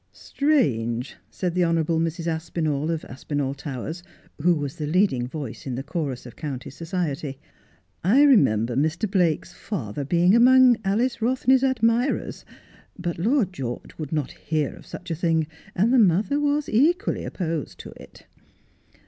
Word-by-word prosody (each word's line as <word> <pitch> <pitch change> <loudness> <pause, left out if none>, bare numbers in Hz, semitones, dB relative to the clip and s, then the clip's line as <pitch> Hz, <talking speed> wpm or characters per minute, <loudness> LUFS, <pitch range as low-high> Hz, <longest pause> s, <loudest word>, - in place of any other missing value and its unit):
'Strange,' 125 - 0
said 180 -2 -3
the 180 0 +2
honourable 165 -1 +1
Mrs. 165 0 -2
Aspinall, 160 -2 -2
of 165 -2 -2
Aspinall 140 +2 -3
Towers, 140 +4 -6 0.4
who 175 +2 +4
was 145 -3 -4
the 150 - -3
leading 155 -8 +2
voice 140 -3 -7
in 130 - -3
the 135 - -4
chorus 145 -5 -4
of 120 - -11
county 135 -5 -6
society. 155 -3 -3 0.7
'I 235 +11 +5
remember 125 - +4
Mr. 160 - 0
Blake's 180 -6 0
father 140 - -5
being 175 +6 +3
among 255 +1 +7
Alice 230 +5 0
Rothney's 255 +2 +3
admirers, 240 0 +1 0.5
but 175 -2 -4
Lord 220 - +1
George 125 -6 -6
would 150 -3 -5
not 150 -4 -1
hear 155 -2 -2
of - - -15
such 180 -1 -8
a - - 0
thing, 165 -1 +1 0.3
and 220 +7 +2
the 260 - +6
mother 210 - +3
was 295 0 0
equally 335 - +2
opposed 165 -5 -4
to - - -10
it.' - - -15
165 Hz, 150 wpm, -24 LUFS, 145-220 Hz, 0.7 s, among